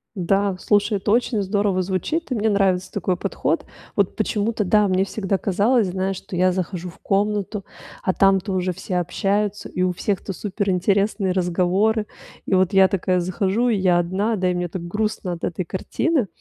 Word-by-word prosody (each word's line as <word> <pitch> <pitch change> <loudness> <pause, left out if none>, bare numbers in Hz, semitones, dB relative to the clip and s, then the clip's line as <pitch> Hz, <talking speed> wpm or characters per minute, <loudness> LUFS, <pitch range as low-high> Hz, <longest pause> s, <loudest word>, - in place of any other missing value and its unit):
Да, 195 +1 +1
слушай, 205 +1 +2
это 200 +2 -1
очень 230 -1 +2
здорово 200 -1 +1
звучит. 200 - -2
И - - +1
мне 220 0 +1
нравится 195 -3 +1
такой 185 -2 -1
подход. - - -1 0.3
Вот - - +1
почему-то, 215 0 0
да, 210 +2 +4
мне 190 0 +2
всегда 195 -1 -1
казалось, 210 +4 +2
знаешь, 190 +1 -2
что 180 - -8
я 185 +1 +3
захожу 180 -1 -3
в 170 - -15
комнату, 205 0 -1 0.4
а 185 - +1
там-то 195 0 +3
уже 185 0 0
все 185 +1 -3
общаются, 200 +4 -1
и 180 - -1
у 185 - +2
всех-то 195 +1 -2
суперинтересные 200 0 0
разговоры. 185 +4 +1 0.4
И - - 0
вот 185 0 +2
я 190 -1 +7
такая 185 -1 0
захожу, 195 +6 0
и 225 - +2
я 185 -2 +3
одна, 190 +6 0
да, 185 -2 0
и - - +1
мне 175 0 -1
так 175 0 -6
грустно 210 -1 -2
от 170 - -9
этой 175 +1 -2
картины. 240 - -1
195 Hz, 180 wpm, -22 LUFS, 185-210 Hz, 0.4 s, я